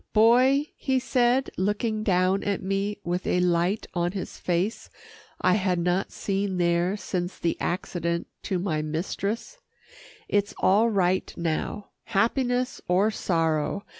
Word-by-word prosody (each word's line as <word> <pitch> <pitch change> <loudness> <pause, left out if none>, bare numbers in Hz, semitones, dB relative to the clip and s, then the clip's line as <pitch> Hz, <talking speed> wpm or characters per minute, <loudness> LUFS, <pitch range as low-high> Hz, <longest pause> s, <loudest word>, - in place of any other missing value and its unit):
"Boy," 255 +6 +5
he 265 -1 0
said 255 0 +2
looking 210 +3 0
down 185 -1 +2
at 200 -1 -1
me 195 +2 -1
with 175 +2 -2
a 180 - +2
light 180 +4 +1
on 175 0 0
his 195 - -6
face 180 +5 -1 0.5
I 180 - +3
had 185 -3 +1
not 180 +3 0
seen 195 -1 -2
there 175 +2 +1
since 180 -2 -3
the 170 - 0
accident 170 -1 -2 0.2
to 190 - 0
my 175 -4 -1
mistress, 200 - -3 0.7
"it's 205 0 0
all 210 +5 +4
right 185 -3 +1
now 170 +5 -3
happiness 245 +4 0
or 190 +5 +3
sorrow. 165 0 0
195 Hz, 135 wpm, -26 LUFS, 175-215 Hz, 0.7 s, Boy